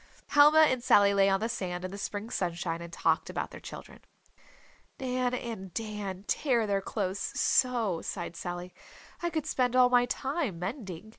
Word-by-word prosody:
Helma 300 Hz, +2 st, +7 dB
and 260 Hz, -6 st, +3 dB
Sally 200 Hz, -3 st, +5 dB
lay 195 Hz, 0 st, +4 dB
on 195 Hz, +1 st, +1 dB
the 225 Hz, -, 0 dB
sand 180 Hz, -5 st, -4 dB
in 185 Hz, -, -5 dB
the 200 Hz, -, -7 dB
spring 205 Hz, +3 st, -5 dB
sunshine 170 Hz, -2 st, -2 dB
and 170 Hz, 0 st, -8 dB
talked -, -, +1 dB
about -, -, -4 dB
their -, -, -9 dB
children. -, -, -10 dB, 1.0 s
"Nan 255 Hz, -1 st, -1 dB
and 220 Hz, -7 st, -6 dB
Dan 210 Hz, -4 st, -4 dB
tear 240 Hz, 0 st, +1 dB
their 200 Hz, -1 st, 0 dB
clothes 195 Hz, -1 st, -3 dB, 0.2 s
so," 230 Hz, -9 st, +2 dB
sighed -, -, -5 dB
Sally, 175 Hz, +1 st, -6 dB, 0.5 s
"I 345 Hz, -, 0 dB
could 315 Hz, -3 st, -2 dB
spend 250 Hz, -1 st, 0 dB
all 250 Hz, -1 st, +6 dB
my 245 Hz, 0 st, +4 dB
time 270 Hz, -, -2 dB
mending." 195 Hz, -, -6 dB
210 Hz, 170 wpm, -29 LUFS, 185-250 Hz, 1.0 s, Helma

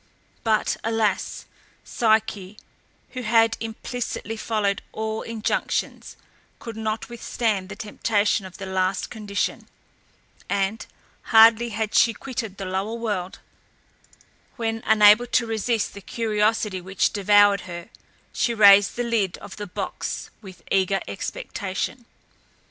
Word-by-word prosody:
But, 220 Hz, -2 st, +1 dB
alas, 225 Hz, -3 st, -1 dB, 0.4 s
Psyche, 215 Hz, -3 st, 0 dB, 0.5 s
who 255 Hz, -, -5 dB
had 225 Hz, -1 st, +3 dB
implicitly 225 Hz, 0 st, -5 dB
followed 210 Hz, -3 st, -1 dB
all 220 Hz, 0 st, -3 dB
injunctions, 225 Hz, -2 st, -3 dB, 0.4 s
could 230 Hz, -2 st, -8 dB
not 220 Hz, 0 st, -3 dB
withstand 220 Hz, -4 st, -2 dB
the -, -, -7 dB
temptation 210 Hz, -2 st, 0 dB
of 185 Hz, -, -13 dB
the 195 Hz, -, -6 dB
last 190 Hz, 0 st, -1 dB
condition; 205 Hz, -3 st, -3 dB, 0.8 s
and, 200 Hz, +2 st, -1 dB, 0.4 s
hardly 230 Hz, +1 st, +6 dB
had 220 Hz, 0 st, -3 dB
she 230 Hz, -2 st, +4 dB
quitted 225 Hz, -7 st, -5 dB
the 195 Hz, -, -5 dB
lower 190 Hz, +4 st, -2 dB
world, 205 Hz, -6 st, -4 dB, 1.1 s
when, 225 Hz, -2 st, -2 dB
unable 215 Hz, +2 st, +6 dB
to 240 Hz, 0 st, +2 dB
resist 225 Hz, 0 st, -1 dB
the 200 Hz, -, -10 dB
curiosity 215 Hz, -2 st, 0 dB
which 190 Hz, +1 st, 0 dB
devoured 205 Hz, -1 st, +5 dB
her, 170 Hz, -1 st, -7 dB, 0.4 s
she 235 Hz, -, 0 dB
raised 205 Hz, -2 st, +7 dB
the 245 Hz, -, -1 dB
lid 220 Hz, -6 st, 0 dB
of -, -, -11 dB
the 205 Hz, -1 st, -6 dB
box 180 Hz, -, -5 dB
with 185 Hz, -5 st, -13 dB
eager 195 Hz, 0 st, +2 dB
expectation. 235 Hz, -, -4 dB
215 Hz, 120 wpm, -24 LUFS, 200-225 Hz, 1.1 s, raised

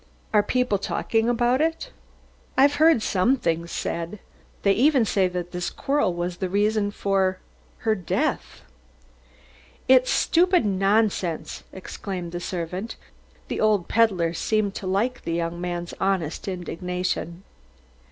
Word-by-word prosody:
"Are 210 Hz, -, +6 dB
people 250 Hz, -1 st, 0 dB
talking 225 Hz, +3 st, 0 dB
about 240 Hz, +3 st, +2 dB
it?" 325 Hz, +10 st, -1 dB, 0.7 s
"I've 280 Hz, +2 st, +5 dB
heard 320 Hz, -8 st, +5 dB
some 225 Hz, +8 st, +2 dB
things 170 Hz, -5 st, -2 dB
said. 170 Hz, +4 st, -3 dB, 0.5 s
They 200 Hz, -, +4 dB
even 260 Hz, +3 st, +4 dB
say 195 Hz, -2 st, +2 dB
that 180 Hz, -1 st, -5 dB
this 180 Hz, -1 st, -3 dB
quarrel 280 Hz, -8 st, 0 dB
was 175 Hz, 0 st, -3 dB
the 185 Hz, 0 st, -2 dB
reason 205 Hz, +1 st, +1 dB
for 195 Hz, -2 st, 0 dB, 0.5 s
her 220 Hz, -, +4 dB
death." 185 Hz, -5 st, -2 dB, 1.3 s
"It's 255 Hz, 0 st, +5 dB
stupid 355 Hz, -, +3 dB
nonsense!" 195 Hz, -3 st, 0 dB
exclaimed 185 Hz, -2 st, -6 dB
the 175 Hz, -, -4 dB
servant. 180 Hz, +5 st, -4 dB, 0.5 s
The -, -, -3 dB
old 210 Hz, -4 st, +2 dB
peddler 190 Hz, -7 st, +2 dB
seemed 210 Hz, +3 st, 0 dB
to 190 Hz, -, -6 dB
like 230 Hz, +7 st, 0 dB
the 165 Hz, -, -3 dB
young 170 Hz, +1 st, -2 dB
man's 175 Hz, -1 st, -4 dB
honest 190 Hz, -5 st, -1 dB
indignation. 180 Hz, -1 st, -3 dB
195 Hz, 130 wpm, -24 LUFS, 175-225 Hz, 1.3 s, Are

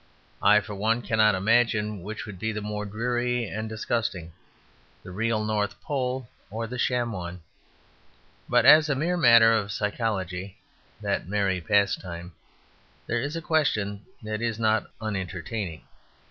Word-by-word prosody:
I, 105 Hz, +1 st, +6 dB
for 105 Hz, -, -8 dB
one, 110 Hz, +4 st, 0 dB
cannot 110 Hz, -2 st, +3 dB
imagine 105 Hz, 0 st, +2 dB
which 105 Hz, +4 st, -6 dB
would 100 Hz, -4 st, -9 dB
be 110 Hz, +2 st, -1 dB
the 105 Hz, -, -3 dB
more 105 Hz, 0 st, -4 dB
dreary 120 Hz, +3 st, -1 dB
and 110 Hz, +1 st, -4 dB
disgusting 110 Hz, -6 st, -2 dB, 0.7 s
the -, -, -9 dB
real 110 Hz, +2 st, 0 dB
North 105 Hz, -3 st, -1 dB
Pole 130 Hz, -3 st, -2 dB, 0.2 s
or 115 Hz, +3 st, -4 dB
the 125 Hz, +2 st, -6 dB
sham 120 Hz, -1 st, +1 dB
one. 90 Hz, -3 st, -6 dB, 1.1 s
But -, -, +4 dB
as 155 Hz, 0 st, +8 dB
a 145 Hz, -, +2 dB
mere 170 Hz, +6 st, 0 dB
matter 115 Hz, -8 st, +7 dB
of 105 Hz, -2 st, 0 dB
psychology 100 Hz, -3 st, -2 dB, 0.4 s
(that -, -, -1 dB
merry 100 Hz, -3 st, 0 dB
pastime) 90 Hz, -2 st, 0 dB, 0.7 s
there 120 Hz, 0 st, -1 dB
is 145 Hz, +4 st, -3 dB
a 165 Hz, -, -4 dB
question 105 Hz, -11 st, 0 dB, 0.2 s
that 110 Hz, 0 st, -4 dB
is 115 Hz, -2 st, -1 dB
not 110 Hz, -1 st, +1 dB
unentertaining. 95 Hz, -3 st, -4 dB
110 Hz, 145 wpm, -26 LUFS, 100-115 Hz, 1.1 s, as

